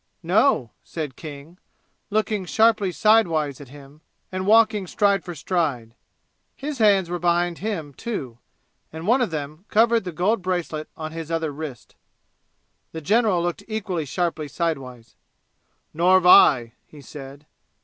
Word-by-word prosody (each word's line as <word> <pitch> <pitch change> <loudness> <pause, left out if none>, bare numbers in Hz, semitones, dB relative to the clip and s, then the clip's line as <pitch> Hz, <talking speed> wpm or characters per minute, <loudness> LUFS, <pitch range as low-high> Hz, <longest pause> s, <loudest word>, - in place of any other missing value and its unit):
"No," 175 - +2
said 150 -6 -6
King, 155 +3 -10 0.5
looking 215 -1 0
sharply 220 -1 +2
sidewise 165 -10 +2
at 140 - -11
him 140 +2 -15 0.3
and 185 0 -4
walking 215 -3 +4
stride 200 0 +1
for 175 -2 -7
stride. 145 -9 -2 0.6
His 280 -1 -6
hands 200 -4 +4
were 175 +1 -4
behind 175 0 0
him, 175 -9 -4
too, 135 - -6 0.5
and 160 +1 -8
one 245 +6 +3
of 245 - +1
them 155 +3 -6
covered 230 +1 +3
the 180 - -5
gold 190 +7 0
bracelet 175 -4 -3
on 155 0 -6
his 165 -1 -7
other 165 -2 -1
wrist. 145 -5 -8 1.0
The 160 - -6
general 205 0 +2
looked 175 -1 -3
equally 195 -7 -3
sharply 160 0 -2
sidewise. 130 -7 -4 0.8
"Nor've 180 +3 +3
I," 120 -9 +6
he 150 - -15
said. 140 +1 -11
170 Hz, 140 wpm, -23 LUFS, 150-200 Hz, 1.0 s, I